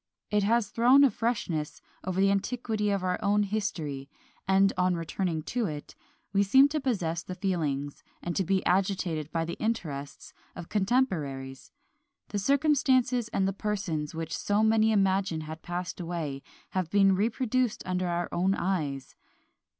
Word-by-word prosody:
It 210 0 +3
has 220 +1 +2
thrown 250 +6 +5
a 275 - +5
freshness 180 -10 -2 0.2
over 185 0 -2
the 195 0 +4
antiquity 210 +1 -1
of 200 -2 0
our 180 0 0
own 205 0 +2
history; 165 -10 -3 0.4
and, 195 +1 +4
on 180 0 +2
returning 165 -1 -2
to 240 -3 +1
it, 150 -3 -7 0.4
we 200 - +4
seem 265 +8 +6
to 305 +1 -1
possess 180 -11 -1
the 185 - -7
feelings, 150 -7 -2 0.2
and 175 - -4
to 195 - +1
be 190 +1 0
agitated 180 -5 0
by 165 -1 -1
the 170 - -4
interests, 155 -11 -4 0.2
of 175 - -8
contemporaries. 160 - -1 0.6
The 205 - -2
circumstances 260 -2 +2
and 195 -4 0
the 195 - -1
persons 185 -8 -3
which 165 0 -3
so 205 +1 +1
many 220 0 +4
imagine 190 -5 +1
had 155 +1 -8
passed 175 +1 -5
away, 165 -6 -4 0.3
have 185 -3 -1
been 195 0 +4
reproduced 235 +3 0
under 185 0 -1
our 175 0 -1
own 190 +3 +1
eyes. 150 -8 -2
190 Hz, 155 wpm, -28 LUFS, 165-215 Hz, 0.6 s, seem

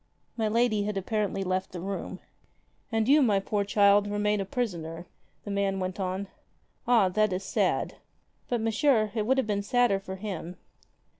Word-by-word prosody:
My 220 -2 0
lady 220 -1 +2
had 210 -1 -2
apparently 200 0 -1
left 185 0 -2
the 180 - -5
room. 195 +3 -5 0.7
"And 225 -1 +1
you, 295 +3 +6
my 210 -7 +3
poor 205 +1 -1
child, 200 0 +4
remain 205 0 0
a - - -3
prisoner," 175 -7 -4 0.4
the 205 - -6
man 200 -1 0
went 185 +1 -3
on. 190 +1 -2 0.6
''Ah, 215 -7 +4
that 215 0 +2
is 185 +1 -2
sad." - - 0 0.5
"But, 240 -2 0
Monsieur, 225 -1 +2
it 215 -2 -1
would 265 +2 +3
have 265 - +2
been 205 -1 -1
sadder 240 -1 +2
for 190 -1 -7
him." 185 -3 -6
205 Hz, 170 wpm, -28 LUFS, 190-220 Hz, 0.7 s, you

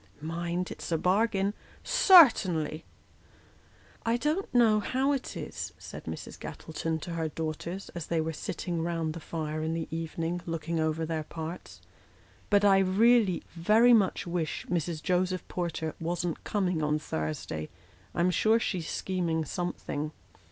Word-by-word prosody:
" 95 - -29
Mind, 170 +3 -3
it's - - -7
a 165 - +3
bargain." 200 +2 +2 0.3
" - - -27 0.3
Certainly." 180 - +6 0.6
" - - -29
I 235 - +3
don't 305 +9 -1
know 230 -3 +5
how 265 +6 +1
it 275 -3 -3
is," - - -5
said - - -9
Mrs. - - -7
Gattleton 160 0 -4
to 175 - -6
her 165 -1 -1
daughters, 165 +4 -4
as 170 -3 -6
they 165 - 0
were 160 0 -1
sitting 170 0 -3
round 165 -2 -1
the 170 - -6
fire 155 -1 -4
in 160 +1 -1
the 165 -1 -3
evening, 165 +1 -3
looking 165 0 -2
over 160 +1 0
their 160 -1 -2
parts, 160 +3 -7 0.3
" - - -29
but 205 -1 +4
I 195 -1 +6
really 200 0 +4
very 215 +8 +5
much 205 -5 +3
wish 170 -2 -2
Mrs. 170 -2 -2
Joseph 185 0 0
Porter 165 -3 -3
wasn't 170 0 -2
coming 180 -5 0
on 150 0 +1
Thursday. 75 - -4 0.5
I 175 - +1
am 180 +1 +3
sure 220 +5 +3
she's 180 -8 -2
scheming 170 -4 -1
something." 155 -2 -3
170 Hz, 160 wpm, -29 LUFS, 160-195 Hz, 0.6 s, Certainly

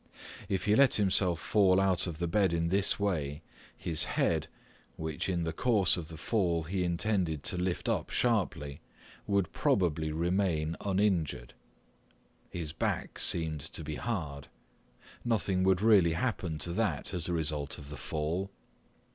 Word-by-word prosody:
If 95 -2 -1
he 105 - +4
let 135 +3 +6
himself 95 -4 +2
fall 95 0 +4
out 95 -1 +2
of 85 -3 -5
the 85 - -1
bed 95 0 +2
in 85 0 +1
this 100 +3 +2
way, 80 -7 -1 0.3
his 80 -3 0
head, - - 0 0.5
which 80 +3 -3
in 85 -2 0
the 80 - -2
course 110 -7 +3
of 85 -3 -5
the 80 0 -9
fall 85 -5 0
he 90 +3 -2
intended 85 -3 0
to 100 - -2
lift 90 0 -2
up - - 0
sharply, 90 - 0 0.5
would 100 -3 +1
probably 80 -4 +1
remain 85 -1 0
uninjured. 95 -11 0 1.0
His 80 -3 -5
back - - -2
seemed 80 -3 -1
to 80 +2 -7
be 75 0 -4
hard; 75 - -4 0.8
nothing 95 -6 +1
would 95 +1 +3
really 100 -7 +5
happen 90 -4 -2
to 85 +3 -3
that 95 -8 -1
as 90 -1 -3
a - - 0
result 75 -3 -1
of 70 - -10
the 75 - -6
fall. 80 +5 -2
85 Hz, 155 wpm, -31 LUFS, 80-95 Hz, 1.0 s, let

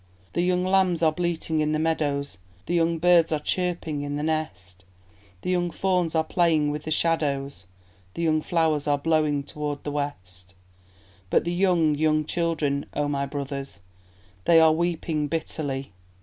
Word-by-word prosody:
The 175 - +1
young 180 0 +1
lambs 185 -3 +2
are 160 - +5
bleating 165 -1 -1
in 155 0 +1
the - - +1
meadows, 145 - -1 0.3
The - - -3
young 170 -1 +2
birds 170 -1 +4
are 155 - +2
chirping 165 -2 -2
in 145 0 -3
the 145 - -3
nest, 95 - -3 0.6
The - - -2
young 175 -1 +1
fawns 180 -2 0
are 160 - +3
playing 160 -3 +2
with 150 0 -5
the - - -4
shadows, 140 - -1 0.5
The 170 - -3
young 155 -1 +2
flowers 160 -3 0
are 145 -1 +3
blowing 150 -1 +1
toward 145 0 -5
the 145 - -3
west 95 -11 -5 0.7
But - - +3
the 170 - -2
young, 175 -4 +3
young 155 0 +1
children, 155 -4 -1
O 145 0 0
my 140 -1 -1
brothers, 140 -5 -6 0.6
They 165 -1 +6
are 160 -1 +6
weeping 165 -2 -1
bitterly! 145 -4 -3
155 Hz, 165 wpm, -25 LUFS, 145-170 Hz, 0.7 s, They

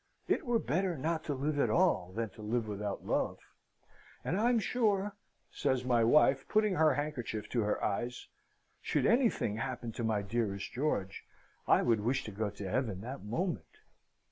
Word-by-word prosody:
It 290 - 0
were 240 -1 +3
better 180 -2 0
not 160 +3 -1
to 145 - -1
live 145 +2 -1
at - - +3
all, 165 - +2
than 115 -1 -1
to 110 - -13
live 110 +1 -1
without 105 -1 -4
love; - - 0 0.9
and 175 - 0
I'm 235 +4 +3
sure," 210 -2 +1 0.4
says 125 -1 0
my 120 -2 +3
wife, 135 +2 +4
putting 215 -2 +3
her 155 -5 +4
handkerchief 125 -8 -3
to 120 - +1
her 105 0 -1
eyes, 120 +4 -2 0.5
"should - - 0
anything 230 - +2
happen 120 -1 -4
to 115 - -5
my 110 -2 +1
dearest 100 -2 -2
George, 110 -8 -1 0.4
I - - +5
would 115 -3 +3
wish 125 +5 0
to 105 - -6
go 105 +1 -2
to 100 -1 -7
Heaven 105 -3 -1
that 130 +5 -6
moment." 115 - -3
125 Hz, 170 wpm, -32 LUFS, 105-160 Hz, 0.9 s, I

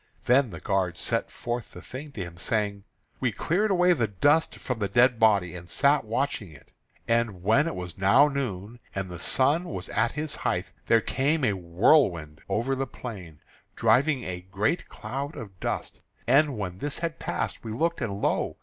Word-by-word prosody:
Then 125 0 +4
the 85 -4 -8
guard 95 -3 0
set - - -1
forth 120 -1 -5
the - - -10
thing 140 +3 -8
to 100 - -4
him, 85 -1 -9
saying: 100 +3 -1 0.3
"We 125 -3 +1
cleared 185 - 0
away 180 -2 +4
the 120 -9 0
dust 145 - +2
from 125 -3 -4
the 100 - 0
dead 120 +3 +4
body, 100 -6 +4
and 85 0 -9
sat 140 - +3
watching 115 - -2
it. 70 - -17 0.4
And 115 -6 0
when 115 - +4
it 165 - -3
was 90 0 -7
now 120 +10 +6
noon, 120 -6 -4 0.2
and 95 -2 -3
the 90 - -7
sun 145 - +2
was 175 - -5
at - - +1
his 150 0 -4
height, - - -2 0.2
there 115 0 +5
came 140 +4 +1
a 105 - +2
whirlwind 85 - +2
over 130 +5 0
the 135 0 -2
plain, 95 -13 -9 0.3
driving 135 -1 +3
a 90 -1 -5
great 100 - -1
cloud 135 +7 -5
of 100 -5 -9
dust. - - -4 0.2
And 140 -3 +3
when 95 -3 -4
this 145 0 -3
had 165 -1 -3
passed, - - -3
we 115 - -5
looked, 165 +7 -1
and 100 -4 -3
lo! - - 0
115 Hz, 185 wpm, -27 LUFS, 95-140 Hz, 0.4 s, now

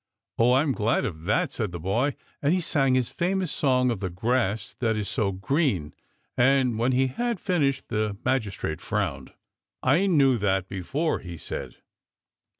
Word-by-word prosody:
Oh, 120 +2 +5
I'm 140 +3 +3
glad 115 -2 +1
of 80 -5 -5
that," 140 - +1
said 110 -6 -2
the 85 - -6
boy, 115 - 0 0.3
and 150 +5 +3
he - - +1
sang 135 -6 +2
his 125 -2 0
famous 185 0 -1
song 125 -3 +2
of 115 - -3
the 95 -1 -2
grass 110 +3 -1
that 110 -3 +1
is 105 -2 -2
so 100 +1 0
green, 95 - 0 0.4
and 130 -2 +3
when 120 +3 +2
he 130 +1 +3
had 235 - -2
finished 150 -9 0
the 105 -2 -1
magis 125 -7 0
trate 80 +2 -4
frowned. 80 -12 -2 0.3
" - - -66
I 155 +10 +3
knew 135 -9 +4
that 95 -2 +1
before," 135 - -2
he 85 -2 -8
said. - - -6
125 Hz, 175 wpm, -26 LUFS, 100-140 Hz, 0.4 s, Oh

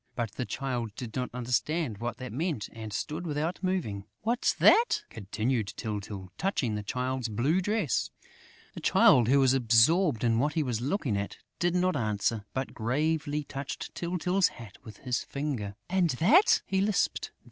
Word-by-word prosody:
But 115 -4 -2
the 125 - -4
Child 120 -4 -3
did 115 -2 -7
not 125 -1 -2
understand 125 +1 -1
what 120 0 -3
that 130 -4 -7
meant 150 - -2
and 110 -1 -7
stood 155 - -3
without 155 +3 -2
moving. 170 - -2 0.2
"What's 235 +3 +1
that?" 470 +2 +5
continued 110 +1 -2
Tyltyl, 100 -3 -5
touching 160 - 0
the 105 - -2
Child's 125 +3 -2
blue 135 - +1
dress. 205 - 0 0.6
The - - -7
Child, 120 -3 +5
who 140 +3 +5
was 135 -1 +4
absorbed 125 - +4
in 115 -1 +3
what 145 +3 +1
he 155 - +1
was 120 -4 -2
looking 135 - -1
at, 100 0 -4 0.2
did 175 -1 +1
not 185 -1 +2
answer, 110 -2 -1
but 130 0 -3
gravely 150 +5 -1
touched 140 0 -6
Tyltyl's 180 +2 +1
hat 110 -4 -11
with 110 -3 -11
his 125 -2 -2
finger: 135 -9 -4
"And 180 -1 +2
that?" 260 - +4
he 190 0 0
lisped. 205 -1 0
130 Hz, 165 wpm, -29 LUFS, 115-165 Hz, 0.6 s, that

